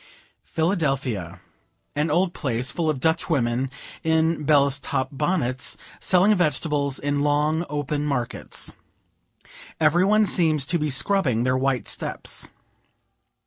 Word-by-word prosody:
Philadelphia. 135 - -1 0.5
An 150 +2 0
old 175 +3 +1
place, 125 -2 -1
full 165 -2 -1
of 150 -4 -1
Dutch 160 +5 0
women, 130 -3 0 0.3
in 160 -1 +1
"bellus 140 -2 +3
top" 135 -1 -2
bonnets, 140 -4 0 0.2
selling 190 +3 +4
vegetables, 150 -5 0
in 145 0 -1
long, 150 +3 +1
open 145 0 -2
markets. 135 -5 -2 1.0
Every 160 +3 +4
one 215 +2 +4
seems 160 -6 +2
to 170 +4 0
be 150 0 -1
scrubbing 130 - +2
their 130 +1 +1
white 130 -2 0
steps. - - -3
150 Hz, 120 wpm, -24 LUFS, 135-165 Hz, 1.0 s, selling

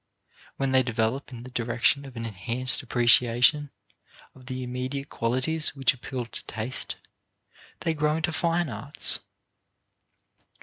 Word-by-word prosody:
When 135 -1 0
they 130 0 +5
develop 120 +2 -1
in 120 -2 -8
the 130 - -10
direction 120 +4 +1
of 135 -2 -11
an 115 0 -4
enhanced 115 +5 0
appreciation 120 +3 +4 0.6
of 130 -1 -17
the 130 -1 -4
immediate 130 +3 -4
qualities 130 +7 0
which 135 -1 +4
appeal 130 -1 -5
to 115 - -6
taste, 120 +4 -3 0.9
they 165 - +1
grow 150 0 +1
into 165 +1 -1
fine 170 +1 +1
arts. 135 +4 0
130 Hz, 130 wpm, -27 LUFS, 120-140 Hz, 0.9 s, they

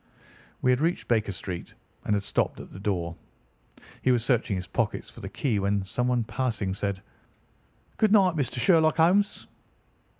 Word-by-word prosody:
We 125 - +4
had 125 - +2
reached 170 +3 0
Baker 110 -3 +1
Street 90 -1 -6 0.3
and 105 - +2
had 100 - -1
stopped 100 - -1
at - - -10
the 95 - -10
door. 90 -4 -2 0.9
He 130 - +3
was 120 -2 +1
searching 120 -6 +1
his 90 -1 -4
pockets - - -2
for - - -13
the - - -6
key 120 -8 -1
when 100 0 0
someone 125 +4 0
passing 110 -5 -2
said: 100 0 -3 0.9
"Good 215 -2 +3
night, 190 -5 +5
Mister 135 -4 -1
Sherlock 160 +1 +4
Holmes." 190 +5 +3
120 Hz, 165 wpm, -27 LUFS, 100-155 Hz, 0.9 s, night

